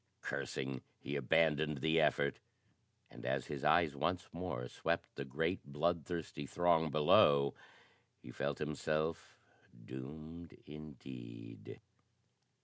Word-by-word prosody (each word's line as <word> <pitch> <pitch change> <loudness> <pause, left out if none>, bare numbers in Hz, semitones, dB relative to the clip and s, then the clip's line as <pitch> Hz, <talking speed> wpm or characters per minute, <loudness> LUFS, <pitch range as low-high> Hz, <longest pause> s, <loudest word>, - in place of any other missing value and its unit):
Cursing, 65 -1 -3 0.2
he 70 - -4
abandoned 75 +2 +3
the 80 +3 +3
effort, 70 -2 +2 0.7
and, - - -11
as 65 +1 0
his 70 -3 -5
eyes 80 -5 +4
once 85 +5 0
more 85 -8 -3
swept 85 +6 -1
the - - -4
great 80 +7 -1
bloodthirsty 80 0 -2
throng 85 -1 +3
below, 70 -2 +6 0.7
he - - -10
felt 70 +3 -1
himself 75 +1 -1 0.5
doomed 75 +6 -8
indeed. 65 -5 -9
75 Hz, 105 wpm, -36 LUFS, 70-80 Hz, 0.7 s, below